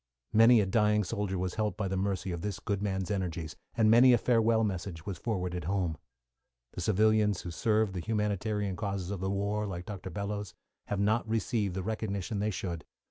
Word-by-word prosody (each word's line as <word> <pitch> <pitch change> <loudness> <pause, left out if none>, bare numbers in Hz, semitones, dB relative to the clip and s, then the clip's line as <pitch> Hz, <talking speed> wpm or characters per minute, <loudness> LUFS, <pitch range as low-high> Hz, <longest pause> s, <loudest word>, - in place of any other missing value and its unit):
Many 115 +1 +7
a - - +1
dying 105 +1 +3
soldier 95 0 -2
was 90 0 -2
helped 105 -1 -1
by 105 -4 -1
the 95 - -2
mercy 95 -1 -1
of 85 -1 -4
this 105 -1 -3
good 100 -3 -2
man's 95 -1 -2
energies, 85 -5 -3 0.2
and 110 -1 +5
many 125 +2 +7
a - - +6
farewell 115 -1 +3
message 90 -4 -3
was 95 -4 -5
forwarded 90 -6 -2
home. 90 -3 0 0.8
The - - -6
civilians 105 0 +3
who 85 - -6
served 105 +3 +1
the 90 - -3
humanitarian 105 -1 -1
causes 100 -2 -3
of 100 - -3
the 95 +1 -2
war, 100 +2 -1
like 90 -2 -5
Dr. 95 -2 -6
Bellows, 100 +1 -4 0.3
have 100 - -2
not 110 +3 +1
received 110 -4 0
the 95 - -2
recognition 105 -1 -3
they 105 +1 +1
should. 85 -5 -4
100 Hz, 190 wpm, -30 LUFS, 95-110 Hz, 0.8 s, Many